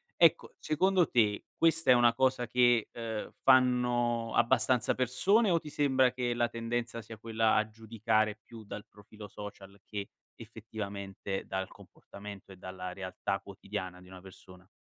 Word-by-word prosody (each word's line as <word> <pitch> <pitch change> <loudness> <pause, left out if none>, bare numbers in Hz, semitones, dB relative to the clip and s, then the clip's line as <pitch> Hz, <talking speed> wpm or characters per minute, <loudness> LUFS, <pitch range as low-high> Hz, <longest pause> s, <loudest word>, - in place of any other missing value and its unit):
Ecco, 165 -2 +4
secondo 175 +3 +2
te, 105 -4 +2
questa 165 -2 +2
è - - +10
una 120 -1 +5
cosa 130 0 +1
che, 120 -1 +3
uhm, 115 -2 -5
fanno 120 -3 +3
abbastanza 120 0 +3
persone, 190 - +2
o 170 -2 +3
ti 150 - -10
sembra 130 -3 +3
che 125 -1 -2
la 120 0 +2
tendenza 115 0 -3
sia 110 0 -11
quella 110 0 +1
a 110 - +2
giudicare 110 -1 -1
più 115 -1 -12
dal 105 0 -8
profilo 105 0 -13
social 100 -1 -10
che 100 -2 -5 0.3
effettivamente 100 -3 -6
dal 95 0 -3
comportamento 100 -1 -12
e - - -11
dalla 90 0 -7
realtà 95 +1 -3
quotidiana 95 -2 -7
di 90 - -16
una 95 0 -12
persona? 95 -1 -15
115 Hz, 150 wpm, -31 LUFS, 100-125 Hz, 0.3 s, è